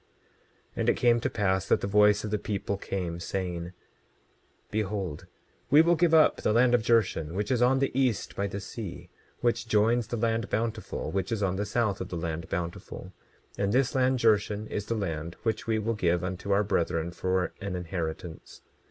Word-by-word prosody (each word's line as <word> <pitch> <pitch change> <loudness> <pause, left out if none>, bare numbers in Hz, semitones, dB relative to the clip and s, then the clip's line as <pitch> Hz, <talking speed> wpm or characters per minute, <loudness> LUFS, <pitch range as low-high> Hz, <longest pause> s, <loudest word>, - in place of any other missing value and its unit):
27:22 - - -39
And - - +1
it - - +3
came 120 -1 +4
to 125 - -1
pass 95 -5 0
that - - +3
the - - -1
voice 105 +1 +4
of 105 - -4
the 105 - 0
people 100 -1 -2
came, 90 -4 -4
saying: 90 -1 -4 1.0
Behold, 95 -5 -3 0.4
we 150 +5 +7
will 170 +1 +4
give 170 0 +3
up 155 - +5
the - - 0
land 120 +2 +4
of 120 - +4
Jershon, 105 -8 +1
which 105 +3 -2
is 125 -2 +2
on 125 +2 +4
the 135 0 +1
east 130 -4 0
by 100 - -1
the 100 0 -5
sea, 100 -1 -8 0.3
which 115 -1 0
joins 110 +2 +2
the 120 - -3
land 115 0 0
Bountiful, 110 0 -2
which 95 +1 -2
is 110 -3 -1
on 95 -1 +1
the 100 +2 -2
south 110 -3 0
of 95 - -5
the 90 - -4
land 80 0 -4
Bountiful; 85 0 -5 0.5
and 100 0 +1
this 130 +2 +2
land 130 -1 +2
Jershon 105 -2 +2
is 105 0 -3
the 115 - -1
land 85 -5 -3
which 110 -1 -1
we 110 -1 +2
will 110 +2 -1
give 90 -5 +1
unto 95 +2 -4
our 100 +1 +4
brethren 85 -3 0
for 95 +1 -1
an 100 -2 -3
inheritance. 85 -2 -5
105 Hz, 195 wpm, -28 LUFS, 90-115 Hz, 1.0 s, we